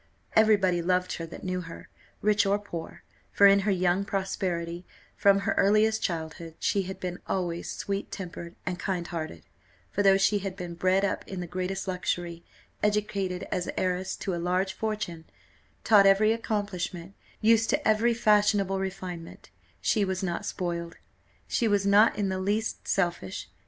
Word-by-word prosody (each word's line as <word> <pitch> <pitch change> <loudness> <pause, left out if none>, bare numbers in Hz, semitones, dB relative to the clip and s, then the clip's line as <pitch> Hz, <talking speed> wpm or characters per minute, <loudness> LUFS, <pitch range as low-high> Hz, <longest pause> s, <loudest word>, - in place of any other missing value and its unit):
Every 220 0 +6
body 180 -3 +1
loved 180 +1 +1
her 165 - -5
that - - -10
knew 185 -1 -2
her, 165 -1 -10 0.4
rich 210 0 +4
or 200 +1 +3
poor, 175 -5 -8 0.3
for 200 - +5
in 200 0 +7
her 200 +1 +1
young 185 0 +2
prosperity, 180 -4 -2 0.3
from 200 0 +4
her - - 0
earliest 215 +2 +3
childhood, 165 -1 -4
she 200 - +1
had 190 0 -6
been 180 0 -4
always 175 -2 -2
sweet 200 0 -4
tempered 175 -2 -7
and 180 -1 -3
kind 180 -3 -2
hearted; 155 - -5 0.5
for 205 - 0
though 195 -1 +6
she 205 +1 +3
had 195 -1 -5
been 180 -3 -6
bred 185 +3 +2
up 200 - -2
in 190 - -5
the 180 - -3
greatest 185 +3 -3
luxury, 175 -2 -3 0.4
educated 205 -3 -1
as 180 - -1
heiress 185 0 -1
to 190 - -3
a 170 - -2
large 185 +2 0
fortune, 200 -6 -4 0.6
taught 205 -3 +6
every 215 +3 +5
accomplishment, 195 -5 -3 0.3
used 225 +1 +4
to 290 0 +1
every 225 +2 +3
fashionable 205 -3 +3
refinement, 185 -3 -6 0.3
she 215 - +2
was 190 -1 -2
not 175 -2 -2
spoiled 170 -2 -3 0.5
she 235 - +1
was 205 -2 +2
not 205 +3 +5
in 200 -2 0
the 190 0 -2
least 210 +4 -2
selfish. 175 - -1
190 Hz, 165 wpm, -28 LUFS, 175-205 Hz, 0.6 s, in